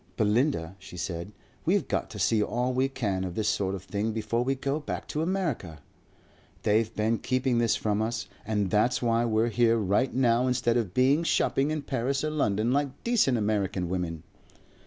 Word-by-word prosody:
Belinda,' 105 Hz, -, +1 dB
she 95 Hz, -2 st, -11 dB
said, 85 Hz, +2 st, -4 dB, 0.3 s
'we've -, -, +1 dB
got -, -, -1 dB
to -, -, -8 dB
see 110 Hz, -2 st, +2 dB
all 125 Hz, +4 st, 0 dB
we 130 Hz, +1 st, +1 dB
can 100 Hz, -8 st, -2 dB
of 90 Hz, -2 st, -5 dB
this 110 Hz, -1 st, -1 dB
sort 100 Hz, -2 st, 0 dB
of 95 Hz, -, -8 dB
thing 105 Hz, +3 st, -2 dB
before 115 Hz, +2 st, -1 dB
we 135 Hz, +2 st, 0 dB
go 140 Hz, +3 st, -2 dB
back 150 Hz, -, -5 dB
to 150 Hz, -, -2 dB
America. 160 Hz, -, -2 dB, 0.9 s
They've 110 Hz, +1 st, +2 dB
been 110 Hz, +1 st, +1 dB
keeping 130 Hz, -2 st, +1 dB
this 115 Hz, -1 st, +2 dB
from 105 Hz, 0 st, 0 dB
us.' 115 Hz, +1 st, -2 dB, 0.2 s
And 105 Hz, -3 st, -1 dB
that's 120 Hz, +4 st, +2 dB
why 115 Hz, 0 st, +2 dB
we're 115 Hz, 0 st, +2 dB
here 115 Hz, 0 st, +3 dB
right 105 Hz, +5 st, +1 dB
now 125 Hz, -1 st, +2 dB
instead 125 Hz, -2 st, +1 dB
of 110 Hz, -7 st, -1 dB
being 135 Hz, +5 st, +4 dB
shopping 145 Hz, -3 st, +1 dB
in 155 Hz, -1 st, -2 dB
Paris 135 Hz, +2 st, -1 dB
or 155 Hz, -, -1 dB
London 110 Hz, -6 st, +1 dB
like 140 Hz, 0 st, -1 dB
decent 220 Hz, -, +3 dB
American 100 Hz, -4 st, -1 dB
women." 85 Hz, -3 st, -3 dB
115 Hz, 185 wpm, -28 LUFS, 105-130 Hz, 0.9 s, being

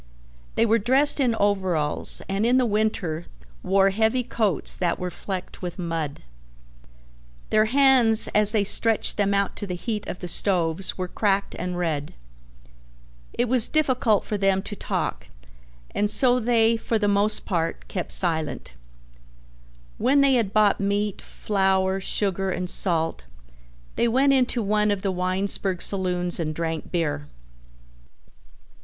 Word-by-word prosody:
They 230 Hz, -, +3 dB
were 230 Hz, +1 st, +3 dB
dressed 265 Hz, +8 st, +2 dB
in 245 Hz, -4 st, +2 dB
overalls 190 Hz, -8 st, 0 dB
and 195 Hz, +2 st, -1 dB
in 245 Hz, +2 st, +3 dB
the 255 Hz, -, +3 dB
winter 210 Hz, -7 st, -1 dB, 0.3 s
wore 195 Hz, +1 st, +3 dB
heavy 225 Hz, +5 st, +1 dB
coats 215 Hz, -7 st, -1 dB
that 175 Hz, -2 st, 0 dB
were 180 Hz, 0 st, -4 dB
flecked 185 Hz, +1 st, -6 dB
with 175 Hz, -2 st, -5 dB
mud. 165 Hz, -5 st, -4 dB, 1.3 s
Their 215 Hz, 0 st, +4 dB
hands 250 Hz, -3 st, +4 dB
as 210 Hz, 0 st, +4 dB
they 215 Hz, -2 st, +2 dB
stretched 225 Hz, +2 st, 0 dB
them 200 Hz, -1 st, +1 dB
out 200 Hz, -1 st, 0 dB
to 205 Hz, -, -5 dB
the 180 Hz, -, -4 dB
heat 210 Hz, +3 st, -4 dB
of -, -, -5 dB
the 180 Hz, -, -7 dB
stoves 175 Hz, -1 st, +1 dB
were 185 Hz, -1 st, -3 dB
cracked 200 Hz, +1 st, 0 dB
and 180 Hz, 0 st, -4 dB
red. 155 Hz, -5 st, -3 dB, 1.2 s
It 240 Hz, -, 0 dB
was 245 Hz, -1 st, +4 dB
difficult 255 Hz, -8 st, +1 dB
for 210 Hz, -, -3 dB
them 195 Hz, -1 st, +2 dB
to 205 Hz, -, -6 dB
talk 60 Hz, -, -3 dB, 0.7 s
and 205 Hz, 0 st, 0 dB
so 250 Hz, +2 st, +2 dB
they 230 Hz, -1 st, +2 dB
for 225 Hz, 0 st, -1 dB
the 210 Hz, -1 st, 0 dB
most 205 Hz, +1 st, +1 dB
part 165 Hz, -3 st, -2 dB
kept 180 Hz, -, -3 dB
silent. 160 Hz, -, -1 dB, 1.3 s
When 280 Hz, +3 st, +3 dB
they 275 Hz, -1 st, +4 dB
had 230 Hz, -6 st, +1 dB
bought 210 Hz, -1 st, +3 dB
meat, 200 Hz, 0 st, -1 dB
flour, 190 Hz, -1 st, 0 dB
sugar, 195 Hz, -1 st, -1 dB
and 180 Hz, 0 st, -3 dB
salt, 165 Hz, -, -1 dB, 0.7 s
they 235 Hz, -, +2 dB
went 270 Hz, +4 st, +3 dB
into 250 Hz, -3 st, +1 dB
one 210 Hz, +1 st, +1 dB
of 205 Hz, -1 st, -1 dB
the 195 Hz, -, 0 dB
Winesburg 185 Hz, 0 st, -1 dB
saloons 180 Hz, -3 st, -1 dB
and 155 Hz, -2 st, -3 dB
drank 165 Hz, -1 st, -4 dB
beer. 145 Hz, -4 st, -2 dB
200 Hz, 145 wpm, -24 LUFS, 180-225 Hz, 1.3 s, Their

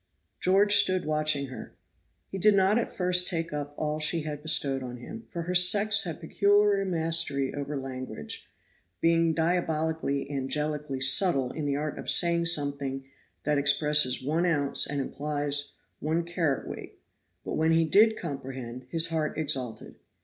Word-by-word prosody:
George 200 Hz, +2 st, +4 dB
stood 185 Hz, -2 st, +2 dB
watching 155 Hz, -2 st, 0 dB
her. 130 Hz, -, -10 dB, 0.6 s
He 195 Hz, -, -5 dB
did 210 Hz, +2 st, +4 dB
not 195 Hz, +3 st, +3 dB
at -, -, -4 dB
first 180 Hz, 0 st, +3 dB
take 165 Hz, -3 st, -3 dB
up 145 Hz, 0 st, -5 dB
all 155 Hz, 0 st, -3 dB
she 155 Hz, +2 st, +1 dB
had 150 Hz, -1 st, -6 dB
bestowed 140 Hz, -3 st, +2 dB
on 125 Hz, -1 st, -7 dB
him, 225 Hz, -, -10 dB
for 170 Hz, -2 st, -5 dB
her 180 Hz, +2 st, -4 dB
sex 200 Hz, +3 st, +5 dB
has 165 Hz, -3 st, -5 dB
peculiar 200 Hz, +3 st, +2 dB
mastery 165 Hz, -6 st, 0 dB
over 145 Hz, 0 st, -5 dB
language, 130 Hz, -, -8 dB, 0.5 s
being 165 Hz, -1 st, +2 dB
diabolically 160 Hz, -4 st, -1 dB
angelically 145 Hz, 0 st, -3 dB
subtle 135 Hz, -1 st, +4 dB
in 150 Hz, -2 st, -5 dB
the 140 Hz, -, -1 dB
art 150 Hz, +1 st, -4 dB
of -, -, -5 dB
saying 170 Hz, -1 st, +4 dB
something 140 Hz, -4 st, 0 dB, 0.4 s
that 150 Hz, -1 st, 0 dB
expresses 145 Hz, -2 st, +2 dB
1 155 Hz, +5 st, -1 dB
oz. 145 Hz, -6 st, +1 dB
and 140 Hz, -1 st, -2 dB
implies 145 Hz, 0 st, -2 dB, 0.3 s
1 160 Hz, +3 st, -2 dB
cwt.; 165 Hz, -7 st, -4 dB, 0.5 s
but -, -, -5 dB
when 160 Hz, +1 st, +1 dB
he 165 Hz, 0 st, +3 dB
did 215 Hz, +7 st, +4 dB
comprehend, 130 Hz, -5 st, -7 dB
his 165 Hz, +2 st, +2 dB
heart 155 Hz, -3 st, -2 dB
exulted. 130 Hz, -8 st, -2 dB
155 Hz, 150 wpm, -27 LUFS, 140-170 Hz, 0.6 s, sex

